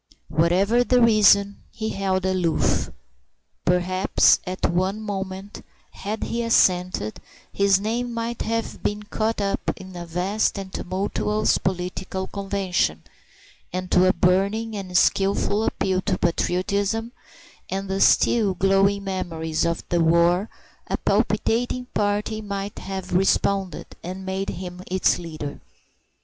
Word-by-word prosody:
Whatever 190 +9 +3
the 250 0 +3
reason, 205 -3 +5
he 220 -1 -4
held 190 -2 -1
aloof. 180 -4 +1 0.8
Perhaps 180 +1 +3
at 185 0 -1
one 185 +4 0
moment, 195 -1 -5 0.3
had 215 +2 -5
he 235 - -2
assented, 180 - +2 0.3
his 200 -1 +3
name 235 +4 -2
might 230 0 -3
have 230 +1 -3
been 210 0 -2
caught 215 +1 -2
up 200 -1 -1 0.2
in 190 -1 -11
a 175 -1 -7
vast 185 +6 0
and 195 -1 -7
tumultuous 200 +3 0
political 185 +1 -3
convention, 195 - -1 0.7
and 185 0 -4
to 185 +1 +5
a 185 - +4
burning 200 +5 +1
and 185 -3 -2
skilful 200 +3 +2
appeal 185 -3 0
to - - -1
patriotism 200 +6 0 0.6
and 195 +1 -3
the 195 +1 -2
still 210 -5 +4
glowing 195 +2 +2
memories 165 -5 -2
of 170 0 -2
the 175 -1 +2
war 170 +4 +3 0.4
a - - -1
palpitating 245 +2 0
party 210 +1 0
might 200 -1 -5
have 190 -1 -6
responded, 195 0 +1 0.2
and 185 +2 -6
made 190 +1 -2
him 180 0 -6
its 185 -1 +2
leader. 155 -4 -6
195 Hz, 125 wpm, -23 LUFS, 180-205 Hz, 0.8 s, reason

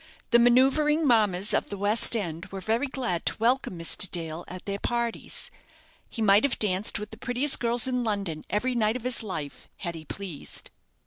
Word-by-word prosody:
The 235 - +6
manoeuvring 270 +6 +4
mammas 210 -6 +3
of - - +1
the 200 - -5
West 210 +4 +3
End 170 -5 -4
were 195 - -7
very 225 +8 0
glad 245 -10 -2
to - - +1
welcome 235 -4 +1
Mr. 170 +3 +1
Dale 165 -1 -4
at 185 0 -8
their 200 0 -3
parties. 235 0 -3 0.6
He 225 - -3
might 200 0 +5
have 280 -3 +1
danced 195 0 +1
with 210 +1 -7
the 220 - -10
prettiest 255 +4 +1
girls 240 +1 +2
in 250 -1 -1
London 200 -8 -2
every 250 +5 0
night 220 -2 +1
of 250 - -5
his 250 -1 0
life 160 -10 -6
had 170 -3 -4
he 160 -1 -9
pleased. 180 -3 -6
215 Hz, 190 wpm, -27 LUFS, 185-245 Hz, 0.6 s, The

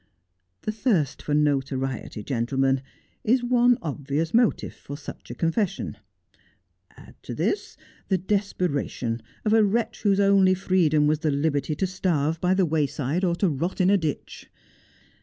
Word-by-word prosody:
The 215 - -1
thirst 205 - 0
for 145 - -1
notoriety, 135 -6 -1
gentlemen, 135 +3 0 0.4
is 245 +3 +2
one 245 0 +4
obvious 145 +1 -2
motive 235 0 +2
for 145 - -9
such 145 - -10
a 120 - -6
confession; 185 - -1 1.0
add - - -14
to - - -7
this 405 - -2 0.3
the 190 - +2
desperation 180 - -2 0.2
of 215 - +3
a 225 -1 +6
wretch 225 +3 0
whose 200 -2 +2
only 195 -2 +5
freedom 170 -5 +2
was 150 0 +2
the 155 - 0
liberty 145 0 0
to 190 - 0
starve 165 -4 -1
by 185 +1 +2
the 190 -1 +3
way 155 -2 +1
side 145 +7 -2
or 175 -2 +2
to 195 - +1
rot 165 +5 -3
in 185 +1 +4
a - - +6
ditch. 155 -4 -5
165 Hz, 155 wpm, -25 LUFS, 145-195 Hz, 1.0 s, a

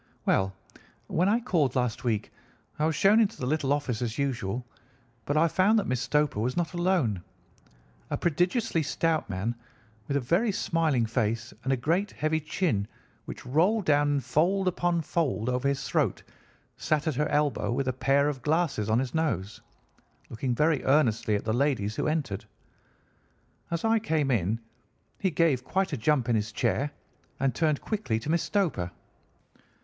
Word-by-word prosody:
"Well, 95 0 +1 0.5
when 180 +4 +1
I 225 +3 +3
called 160 - +1
last 125 -3 -1
week 110 -4 -1 0.5
I 155 - +3
was 160 - 0
shown 200 +7 +5
into 220 -1 +2
the 125 - -4
little 140 0 0
office 140 -6 -1
as 120 -2 -2
usual, 125 -4 -2 0.6
but 145 - 0
I 165 +2 +5
found 190 +7 +3
that 205 - +1
Miss 130 -2 -1
Stoper 150 -5 +1
was 125 +6 -1
not 175 -1 -1
alone. 175 - +1 0.9
A - - -1
prodigiously 175 - +1
stout 160 -1 0
man 100 +5 -2 0.5
with 140 - 0
a - - +2
very 175 - +1
smiling 160 -10 +1
face 115 -1 -1
and 135 - 0
a 135 - +2
great 170 +11 0
heavy 155 -1 -1
chin 150 - -1 0.4
which - - -8
rolled 180 - +2
down 145 -1 +3
in 140 - +2
fold 180 +9 +1
upon 175 -1 +1
fold 135 -9 -1
over 125 +2 0
his 140 0 -1
throat - - 0 0.5
sat 150 -1 0
at 155 - 0
her 150 +3 0
elbow 145 -4 +1
with 135 +2 -1
a 130 - +1
pair 135 +2 +2
of 140 -3 -3
glasses 150 -8 0
on 110 - +3
his 130 0 -1
nose, 115 -11 -1 0.7
looking 120 +2 -2
very 150 +1 +2
earnestly 120 -7 +2
at 105 - -3
the 110 - 0
ladies 120 -5 0
who - - 0
entered. 145 -11 -2 1.3
As 170 +4 -2
I 225 0 +3
came 155 -9 0
in 110 -1 +1 0.6
he 190 - +1
gave 155 -7 +2
quite 190 +3 -1
a - - +2
jump 125 +1 +1
in 120 - +2
his 110 0 -1
chair 140 +5 0 0.5
and 135 -1 +1
turned 155 0 +1
quickly 205 - -1
to 145 - -2
Miss 170 0 +2
Stoper. 160 - 0
145 Hz, 175 wpm, -28 LUFS, 120-165 Hz, 1.3 s, shown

